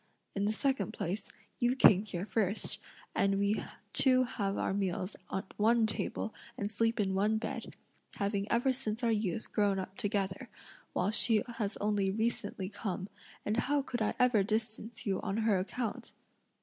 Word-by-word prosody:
In 200 0 0
the 210 - +2
second 260 -4 0
place, 195 +5 -3 0.3
you 245 +1 +3
came 205 -7 +7
here 190 -3 -4
first, 210 -1 0 0.3
and 195 0 +2
we 200 +2 +1 0.3
two 255 -1 +5
have 200 -5 -2
our - - 0
meals 190 -1 -1 0.2
at 190 +1 -4
one 225 +2 +4
table 220 0 -2 0.2
and 205 +1 -2
sleep 225 +2 +1
in 195 -2 +1
one 210 +3 +2
bed, 220 - -5 0.4
having 200 0 -1
ever 245 +3 +3
since 245 -2 -2
our 230 - +3
youth 215 0 -1
grown 205 -2 +2
up 190 0 -5
together; 205 +1 -1 0.4
while 185 +3 +1
she 220 -1 +4
has 205 -3 -1
only 205 -2 +1
recently 205 -2 -1
come, 190 -1 -4 0.4
and 210 +2 0
how 280 +3 +2
could 245 -3 -3
I 215 - +1
ever 250 -4 +4
distance 220 +2 -2
you 195 -3 0
on 200 0 -2
her 205 -4 +4
account?" 215 +4 -4
210 Hz, 165 wpm, -32 LUFS, 195-230 Hz, 0.4 s, came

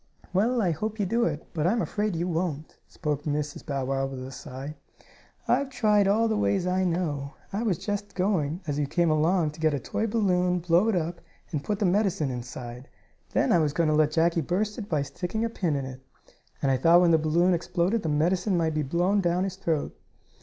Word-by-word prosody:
"Well, 225 +5 +2
I 175 - +2
hope 215 +7 -3
you 205 - +1
do 230 +5 +1
it, 150 -1 -3
but 160 0 0
I'm 225 +6 +2
afraid 210 -3 -1
you 170 +2 -1
won't," 160 -3 -3
spoke 150 -4 -3
Mrs. 150 -1 -2
Bow 140 -4 -2
Wow 135 0 0
with 130 -1 -6
a 130 - -8
sigh. 135 +3 -8 0.7
"I've 270 +3 +2
tried 210 -6 +3
all 220 +3 +3
the 220 - 0
ways 200 -3 +1
I 185 +1 +1
know. 155 -6 -2 0.2
I 205 - -1
was 210 -8 +1
just 205 +1 -4
going, 180 -4 0
as 145 -2 -2
you 145 - 0
came 170 +2 +2
along, 160 +1 +2
to 150 - -15
get 155 -2 +2
a - - -2
toy 220 - -2
balloon, 180 -5 +2
blow 175 +4 +3
it 225 - +2
up, 170 0 -2 0.3
and 150 -4 -2
put 210 - -1
the 205 - 0
medicine 185 -6 +1
inside. 125 0 -7 0.4
Then - - +2
I 175 - +5
was 150 -3 +1
going 165 0 +2
to 155 - +3
let 155 -1 +4
Jackie 165 +2 +2
burst 205 - -1
it 205 - -7
by 150 -4 +1
sticking 185 +9 -3
a - - -1
pin 175 -9 -1
in 135 -1 -2
it. 130 0 -8 0.6
And 135 - +3
I 130 - +3
thought 170 +6 +6
when 175 -1 +4
the 160 - +5
balloon 170 +4 +3
exploded 175 +5 0
the 160 - -2
medicine 180 +6 +1
might 160 -2 +1
be 155 - 0
blown 175 +8 +1
down 175 0 +1
his 190 -1 -3
throat." 165 -6 -2
170 Hz, 225 wpm, -27 LUFS, 150-195 Hz, 0.7 s, thought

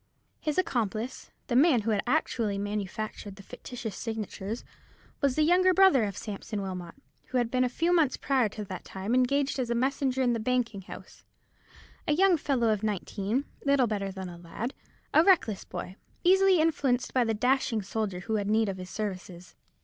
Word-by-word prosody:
His 300 -2 -2
accomplice, 240 - -1 0.2
the 240 - -2
man 270 -3 +5
who 225 +2 -1
had 205 -2 +1
actually 235 -7 0
manufactured 205 0 -4
the 195 - -13
fictitious 235 -1 -7
signatures, 220 -1 -5 0.6
was 275 -3 +2
the 310 - +3
younger 365 +3 +4
brother 375 - +6
of 200 -1 -5
Sampson 210 0 -5
Wilmot, 180 -3 -6 0.3
who 260 - -1
had 240 -2 0
been 255 0 +2
a 250 - +1
few 335 +7 +1
months 310 -7 +3
prior 260 -5 +1
to 210 0 -6
that 185 -1 -7
time 195 +4 -4
engaged 270 +2 +2
as 245 -2 -1
messenger 265 +2 +1
in 245 -1 +2
the 230 - -1
banking 230 -3 -1
house—a 245 +8 -9
young 375 +3 +5
fellow 270 -7 +1
of 215 -2 +1
nineteen, 210 +4 -2 0.2
little 280 -2 +4
better 200 -3 -2
than 190 -1 -6
a 175 -1 -9
lad; 215 +9 -5 0.4
a 315 - +7
reckless 320 - +3
boy, 180 +1 -6 0.3
easily 380 +1 +5
influenced 285 -6 +1
by 255 - +4
the 225 -1 0
dashing 250 -1 +1
soldier 195 -2 -3
who 220 +3 -1
had 205 -1 -2
need 220 0 +3
of 190 - -4
his 185 0 -8
services. 185 -4 -6
230 Hz, 180 wpm, -28 LUFS, 205-270 Hz, 0.6 s, a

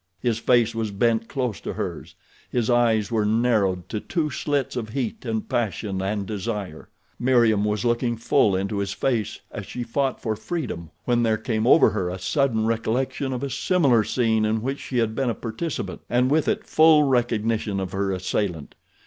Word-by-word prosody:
His 115 -3 0
face 120 -1 +3
was 115 -1 -2
bent 115 +2 +1
close 125 - -3
to - - -4
hers. - - -5 0.3
His 120 -1 0
eyes 115 -3 +2
were 110 -2 +1
narrowed 105 -5 +1
to 105 - -2
two 155 +5 -2
slits 140 -2 -1
of 115 -3 -3
heat 125 0 -4
and 110 -2 -2
passion 105 -4 -2
and 100 +1 -2
desire. 100 -5 -5 0.3
Meriem 120 -5 +3
was 105 +1 -1
looking 120 0 +1
full 110 -3 +3
into 100 +2 -2
his 100 0 -2
face 110 -5 -1
as 100 -4 -7
she 125 - -5
fought 135 +3 -1
for 110 -2 -2
freedom 110 - -5 0.2
when 120 -1 +2
there 110 -2 +2
came 110 0 -1
over 135 -4 +6
her 95 -3 -1
a 90 - -4
sudden 110 +5 +1
recollection 115 +4 -1
of 125 +1 -3
a 140 - -2
similar 140 - +3
scene 110 -2 +1
in 110 +1 0
which 135 +2 -2
she 125 - -4
had 115 -2 +1
been 130 +2 0
a 115 - -1
participant 125 +7 -4
and 125 +2 +2
with 155 +1 +2
it - - 0
full 155 -1 +5
recognition 115 -5 0
of 95 -1 -4
her 95 0 -1
assailant. 90 -3 -2
115 Hz, 185 wpm, -24 LUFS, 105-125 Hz, 0.3 s, over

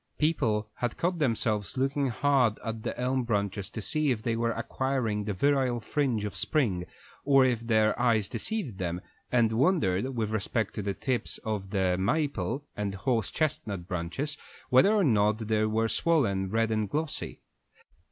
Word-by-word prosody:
People 110 -9 +1
caught 170 +9 -1
themselves 110 -5 0
looking 135 +1 +1
hard 130 -3 +2
at 110 -1 -3
the - - -4
elm 130 +1 +1
branches 100 -4 -1
to 110 - -6
see 155 +2 +1
if 115 -4 -1
they 115 0 0
were 115 0 0
acquiring 115 -3 -1
the 105 - -1
virile 130 +1 +2
fringe 120 -2 -1
of 105 - -5
spring 100 - 0 0.4
or 135 -2 +5
if 125 -3 +1
their 110 -2 +3
eyes 110 -4 +3
deceived 160 - -3
them, 90 -1 -2 0.3
and 120 -3 +3
wondered, 130 - +1
with 110 -2 -1
respect 110 +1 -1
to - - -3
the 100 -1 -2
tips 130 -3 -2
of 100 -3 -3 0.3
maple 130 - -1
and 100 -1 -3
horse 110 +1 0
chestnut 105 - -2
branches, 95 - -3 0.3
whether 130 +11 +6
or 215 -2 +3
not 105 - +3
they 110 -1 0
were 110 +1 +1
swollen 110 - +1
red 115 +2 +1
and 110 -2 0
glossy. 150 +5 -3
115 Hz, 160 wpm, -28 LUFS, 105-135 Hz, 0.4 s, whether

